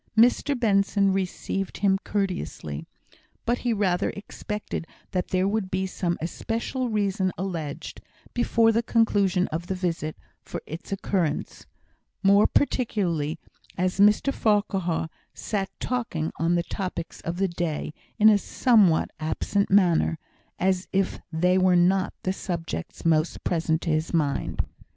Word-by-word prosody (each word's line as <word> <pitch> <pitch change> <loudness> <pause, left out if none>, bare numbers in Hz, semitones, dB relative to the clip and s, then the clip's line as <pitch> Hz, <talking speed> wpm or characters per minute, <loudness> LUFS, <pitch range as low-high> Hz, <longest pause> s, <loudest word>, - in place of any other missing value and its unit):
Mr 245 +4 +4
Benson 200 -3 +3
received 195 0 -2
him 195 -1 +2
courteously, 180 - -3 0.6
but 240 +1 +1
he 245 - 0
rather 195 -5 +1
expected 210 -3 -5 0.2
that 180 -1 -1
there 185 +1 +1
would 205 -2 -1
be 190 0 -1
some 175 -2 -2
especial 230 +8 -3
reason 195 -3 0
alleged, 165 -6 -5 0.3
before 230 -1 +3
the 225 +1 +2
conclusion 205 -6 +2
of 165 +3 -4
the 190 - -1
visit, 170 -4 -2 0.2
for - - -6
its 160 +5 -8
occurrence; 185 -5 -2 0.6
more 200 +1 +6
particularly 180 - 0 0.4
as 185 +1 0
Mr 210 +7 +5
Farquhar 195 -6 +1 0.3
sat 195 -3 -2
talking 235 -11 -2
on 165 +1 +2
the 170 - +1
topics 180 -3 -5
of 170 +1 -4
the 195 +1 +2
day 170 -4 -3 0.2
in 215 -1 +6
a 210 -2 +7
somewhat 205 -8 +3
absent 195 +5 0
manner, 180 -4 +4 0.4
as 185 0 +1
if 195 0 0
they 180 +3 +3
were 185 -1 +4
not 185 +2 +3
the 185 - 0
subjects 165 - -5
most 160 0 +2
present 165 -1 0
to 165 - 0
his 155 +2 0
mind. 145 -4 0
190 Hz, 135 wpm, -26 LUFS, 170-205 Hz, 0.6 s, a